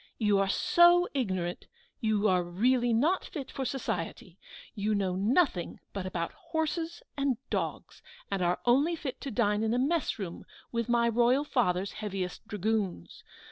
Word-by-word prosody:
You 210 -3 +3
are 195 0 +1
so 345 - +5
ignorant, 185 -10 -2 0.3
you 215 -1 +2
are 185 -3 +3
really 240 +8 +2
not 300 +12 +2
fit 280 -5 -7
for 265 - -3
society! 190 -7 -4 0.3
You 210 0 0
know 190 -3 0
nothing 210 - +1
but 195 -2 -3
about 170 -2 -3
horses 330 +4 -3
and 275 -4 0
dogs, - - -3 0.3
and 195 -2 -1
are 175 0 +1
only 280 +8 +4
fit 280 -5 -6
to 280 - -4
dine 210 -3 +1
in 225 +1 +1
a - - +1
mess 295 +4 +1
room 185 -5 -6 0.3
with 235 0 -2
my 235 0 +3
Royal 240 +4 +3
Father's 195 -9 0
heaviest 195 -2 -5
dragoons. 205 - -2
225 Hz, 155 wpm, -30 LUFS, 195-270 Hz, 0.3 s, so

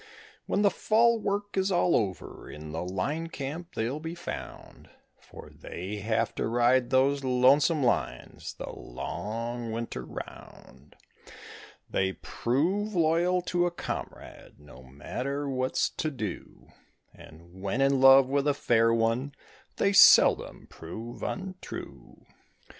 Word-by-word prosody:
When 205 - +1
the 200 - +4
fall 230 +4 +3
work 205 0 -3
is 190 0 +1
all 175 -1 +3
over 95 -5 -3
in 75 0 -9
the 80 - -4
line 120 - -3
camp 160 +3 -7
they'll 120 +6 -2
be 160 +2 -6
found, 175 - -9 0.3
For - - -13
they 95 +4 -7
have 110 +2 -1
to - - -1
ride 120 +2 +2
those 135 +2 +2
lonesome 135 +4 +3
lines 120 - -2
the - - -7
long 115 +2 -5
winter 115 - -4
round; 65 +2 -11 0.9
They 95 0 0
prove 185 - -1
loyal 175 +2 +2
to 175 0 +1
a - - 0
comrade, 175 - -7
no 70 -3 -15
matter 125 - -5
what's 130 -1 0
to 155 - -2
do; 110 - -7 0.4
And 85 +4 -15
when 100 +6 -2
in 135 -1 +3
love 135 0 +8
with 140 +2 0
a 145 - +2
fair 115 -4 +3
one 115 +5 0 0.4
they 200 - +1
seldom - - +6
prove 110 +9 -9
untrue. 190 -1 -7
130 Hz, 130 wpm, -28 LUFS, 110-165 Hz, 0.9 s, love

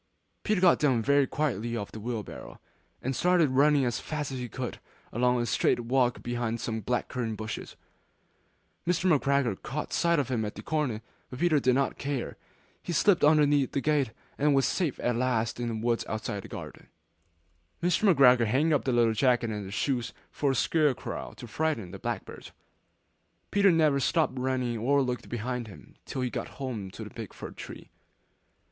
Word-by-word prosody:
Peter 215 -3 +1
got 180 -1 +5
down 130 -6 +2
very 140 +2 +3
quietly 120 -6 -1
off 100 -2 -5
the 110 - -8
wheelbarrow; 110 -1 -6 0.4
and 130 +1 -1
started 175 -4 +3
running 140 +1 +4
as 120 -2 -1
fast 150 -3 -4
as 130 - -4
he 125 -1 -5
could 125 +3 -4
go, - - -13 0.3
along 125 +1 +2
a 120 - 0
straight 120 - +1
walk 125 0 +1
behind 120 -1 -2
some 110 0 -3
black 125 +4 -1
currant 115 -4 -3
bushes. 110 0 -6 1.1
Mr. 180 +1 +1
McGregor 140 -7 +1
caught 150 +4 -4
sight 170 0 +2
of 140 -3 0
him 120 -4 0
at 105 - -4
the - - -8
corner, 135 -9 -1 0.3
but 125 - -8
Peter 160 -1 +3
did 130 -2 +2
not 135 0 0
care. 140 -3 -3 0.5
He - - -5
slipped 175 +3 +3
underneath 145 -2 +4
the - - +1
gate, 145 -3 +1 0.3
and 145 0 +3
was 135 - +3
safe 170 -8 -1
at 120 -1 +1
last 120 -2 0
in 120 - -2
the 115 - -2
wood 115 +1 0
outside 110 -2 -3
the - - -10
garden. - - -9 1.0
Mr. 180 +3 +4
McGregor 125 -6 +6
hung 150 +7 +2
up 145 - +1
the 130 - +1
little 120 -2 +3
jacket 120 -1 +2
and 105 -2 -4
the - - -8
shoes 120 +2 -1 0.2
for 145 - 0
a 135 - +1
scare 150 +1 +2
crow - - -6
to - - -8
frighten 120 - -2
the 95 - -8
blackbirds. 115 -2 -5 1.0
Peter 200 -1 +5
never 155 -4 +3
stopped 155 +2 +1
running 125 -3 -1
or 140 +5 +3
looked 125 -1 -4
behind 120 0 -3
him 100 - -13
till 130 - -3
he 125 - -1
got - - -4
home 120 -8 -4
to - - -8
the - - -9
big - - -8
fir - - -8
tree. - - -10
130 Hz, 190 wpm, -28 LUFS, 115-145 Hz, 1.1 s, McGregor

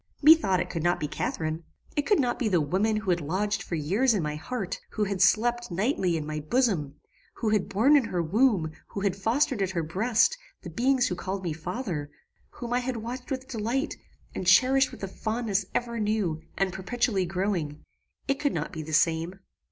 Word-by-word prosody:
Methought 275 - +6
it - - -1
could 165 - -3
not 175 +2 +2
be 150 - -2
Catharine. 155 +2 -3 0.3
It 290 - 0
could 415 - +4
not 245 -3 0
be 240 - +1
the 185 -5 +3
woman 190 +9 +1
who 205 -3 0
had 175 -1 +1
lodged 195 +7 -1
for 170 - -4
years 200 - +2
in 190 - 0
my 150 0 -2
heart; 195 +3 -4
who 215 - 0
had 195 -2 -2
slept, 240 +5 +3
nightly, 190 - 0
in 155 - -4
my 155 0 -3
bosom; 155 - 0 0.4
who 225 - -1
had 210 -3 +1
borne 240 +10 +4
in 275 -5 +4
her 180 - -2
womb, 195 -2 +2 0.2
who 200 - -6
had 195 -2 +1
fostered 230 +4 +1
at 190 - +1
her 175 -3 -2
breast, 225 - +2 0.2
the - - -7
beings 255 +1 +2
who 180 - -2
called 190 +2 -4
me 170 -3 -2
father; 165 - -4 0.4
whom 240 -1 -6
I 245 - +3
had 250 -1 -3
watched 245 +3 -6
with 260 -1 -4
delight, 245 +3 -2 0.4
and 185 - -4
cherished 260 +7 +5
with - - -11
a - - -1
fondness 215 -1 -2
ever 235 -1 -1
new 205 -7 0 0.2
and 190 -2 +1
perpetually 195 -1 0
growing: 175 -5 -2 0.4
it 275 0 0
could 285 -1 0
not - - -3
be 160 - -4
the 155 0 -7
same. 165 +4 +1
200 Hz, 205 wpm, -27 LUFS, 175-245 Hz, 0.4 s, Methought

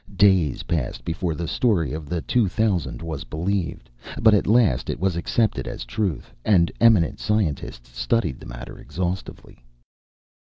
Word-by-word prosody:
Days 95 -8 +3
passed 75 -8 -3
before 85 0 -2
the 85 +1 -4
story 90 - +1
of 75 -1 -6
the 85 -1 -1
two 120 -5 +2
thousand 90 - -1
was 80 -3 -4
believed, 85 +3 -3 0.3
but 110 -1 +6
at 105 - +3
last 110 - +3
it - - -2
was 95 -1 +1
accepted 110 +6 0
as - - -5
truth, 90 - -3
and 90 -5 +4
eminent 110 -9 +4
scientists 75 - -2
studied 95 - 0
the - - -11
matter - - -9
exhaustively. 90 -5 -5
90 Hz, 150 wpm, -23 LUFS, 80-105 Hz, 0.3 s, but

